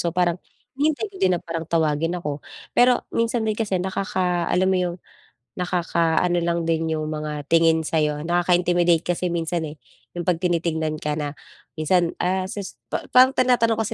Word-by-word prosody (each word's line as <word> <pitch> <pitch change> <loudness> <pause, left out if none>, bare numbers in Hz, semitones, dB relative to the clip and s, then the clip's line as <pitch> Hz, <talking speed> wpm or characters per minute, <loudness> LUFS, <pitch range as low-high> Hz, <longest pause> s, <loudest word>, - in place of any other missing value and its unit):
So 170 - 0
parang 175 0 0 0.4
hinihintay 310 +7 +1
ko - - -12
din 185 - +4
na - - -6
parang 165 -1 -5
tawagin 165 +1 +1
ako, 150 -4 -4 0.3
pero 245 0 +4
minsan 230 0 0
din 215 - +1
kasi 210 -3 -1
nakaka 180 -1 -1
alam 180 +1 +2
mo - - +2
yung, 175 -1 -2 0.6
nakaka 170 -2 0
ano 175 -1 +1
lang 170 0 0
din 165 -1 0
yung 155 - -3
mga 150 -1 -4
tingin 165 0 +3
sa'yo, 150 -1 0
nakaka-intimidate 175 -1 +2
kasi 175 0 0
minsan 170 0 -1
eh. 150 - -11 0.4
'Yung 175 -1 -5
pag 175 - +2
tinitingnan 165 -3 0
ka 150 - -1
na 145 -2 -3 0.4
minsan, 170 +2 +2
ah, 185 +1 0
ses 200 -7 -6 0.2
pa - - -2
parang 255 +2 +7
tinatanong 245 -4 +3
kasi 220 - -2
175 Hz, 175 wpm, -23 LUFS, 160-185 Hz, 0.6 s, parang